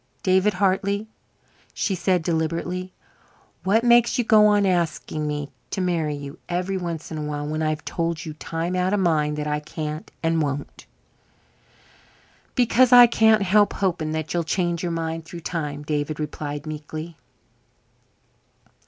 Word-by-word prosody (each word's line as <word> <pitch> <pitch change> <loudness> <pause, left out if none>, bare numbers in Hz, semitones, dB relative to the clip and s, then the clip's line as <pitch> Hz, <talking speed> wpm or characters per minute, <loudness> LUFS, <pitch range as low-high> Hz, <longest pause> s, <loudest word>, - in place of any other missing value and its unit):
"David 190 +2 +3
Hartley," 200 +2 +1 0.7
she 195 - 0
said 180 -1 +1
deliberately, 170 +3 -2 0.7
"what 215 +4 +3
makes 240 -1 +5
you 245 - +2
go 215 -2 +6
on 205 -1 +3
asking 170 -4 -1
me 145 -1 -3 0.2
to - - -3
marry 165 -5 0
you 140 -1 -8
every 180 +2 -1
once 170 -4 -4
in 155 - -4
a - - -3
while 150 -1 -3
when 155 +1 -3
I've 155 -1 -1
told 165 0 -2
you 155 - -5
times 165 +3 -3
out 185 +2 +1
of - - 0
mind 150 -4 +1
that 150 - -2
I 150 0 -1
can't 155 +1 -6
and 165 0 +2
won't?" 145 -1 -4 1.7
"Because 250 0 +4
I 245 -1 +10
can't 220 -2 +4
help 205 +2 +4
hoping 170 -5 -1
that 160 0 -3
you'll 170 -1 0
change 175 0 -1
your 175 - -2
mind 165 -1 -3
through 170 +2 -9
time," 150 -4 -4
David 150 0 -2
replied 145 -1 -5
meekly. 155 +2 -6
165 Hz, 155 wpm, -23 LUFS, 155-190 Hz, 1.7 s, I